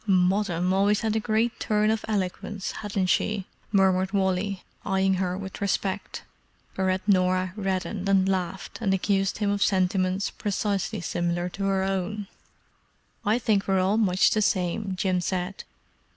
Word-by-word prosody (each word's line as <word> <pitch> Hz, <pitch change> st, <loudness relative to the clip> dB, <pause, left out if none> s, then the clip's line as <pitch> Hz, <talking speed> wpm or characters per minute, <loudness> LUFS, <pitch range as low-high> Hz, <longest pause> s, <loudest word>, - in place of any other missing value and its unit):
"Moddam 185 Hz, -1 st, +2 dB
always 200 Hz, +2 st, +3 dB
had 220 Hz, -1 st, 0 dB
a -, -, +2 dB
great 220 Hz, +2 st, 0 dB
turn 215 Hz, 0 st, +2 dB
of 220 Hz, 0 st, -1 dB
eloquence, 200 Hz, -1 st, -2 dB
hadn't 205 Hz, -3 st, -2 dB
she?" 195 Hz, +1 st, +1 dB, 0.3 s
murmured 190 Hz, -1 st, +3 dB
Wally, 190 Hz, 0 st, 0 dB, 0.2 s
eyeing 190 Hz, 0 st, +2 dB
her 180 Hz, -1 st, -1 dB
with 195 Hz, +1 st, -7 dB
respect. 195 Hz, 0 st, -2 dB, 0.5 s
Whereat 185 Hz, +1 st, 0 dB
Norah 185 Hz, -1 st, +2 dB
reddened 195 Hz, -1 st, -2 dB
and 190 Hz, -1 st, +4 dB
laughed, 190 Hz, -1 st, -2 dB
and 195 Hz, -4 st, +2 dB
accused 195 Hz, 0 st, 0 dB
him 205 Hz, -1 st, 0 dB
of 205 Hz, 0 st, -1 dB
sentiments 185 Hz, 0 st, +1 dB
precisely 205 Hz, 0 st, -2 dB
similar 175 Hz, +1 st, -1 dB
to 195 Hz, +2 st, -4 dB
her 195 Hz, -1 st, +1 dB
own. 195 Hz, +2 st, -2 dB, 1.0 s
"I 215 Hz, +1 st, +2 dB
think 210 Hz, -5 st, +1 dB
we're 195 Hz, -1 st, +2 dB
all 190 Hz, +3 st, +2 dB
much 190 Hz, -4 st, +3 dB
the 215 Hz, -, +2 dB
same," 190 Hz, 0 st, 0 dB
Jim 185 Hz, -1 st, 0 dB
said. 185 Hz, +1 st, -3 dB
195 Hz, 150 wpm, -26 LUFS, 185-205 Hz, 1.0 s, and